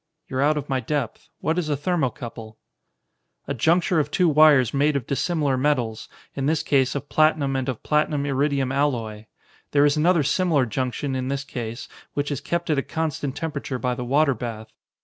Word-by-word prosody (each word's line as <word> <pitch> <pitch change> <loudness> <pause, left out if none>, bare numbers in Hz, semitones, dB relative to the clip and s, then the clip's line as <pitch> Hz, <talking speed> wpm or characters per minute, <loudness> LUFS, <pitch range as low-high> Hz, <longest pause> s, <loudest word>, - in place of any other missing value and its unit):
"You're 130 0 -2
out 150 +2 +3
of 145 -1 -4
my 135 -1 0
depth. 130 -1 -3
What 160 +3 0
is 160 -3 -3
a 145 - 0
thermocouple?" 125 -8 -3 0.9
"A 140 - -1
juncture 170 - +2
of 150 -1 0
two 180 +3 +2
wires 150 -5 +5
made 145 +1 +2
of 135 -4 -1
dissimilar 145 -2 0
metals, 125 -6 -1 0.2
in 135 0 -2
this 155 0 +1
case 135 -2 +2
of 140 0 -4
platinum 155 -3 +2
and 130 0 -1
of 125 - -5
platinum 150 -1 +1
iridium 140 -1 0
alloy. 120 -7 -1 0.5
There 145 0 +5
is 145 +1 +2
another 165 0 +3
similar 150 -1 +2
junction 130 +3 -2
in 130 0 -2
this 135 0 -2
case, 120 -3 -6 0.3
which 145 +1 -1
is 140 - -3
kept 170 -1 -2
at 145 - +2
a - - +1
constant 145 -3 -3
temperature 145 -4 -4
by 125 +1 -1
the 125 0 -5
water 140 +3 +3
bath. 115 -3 -7
140 Hz, 190 wpm, -23 LUFS, 130-150 Hz, 0.9 s, wires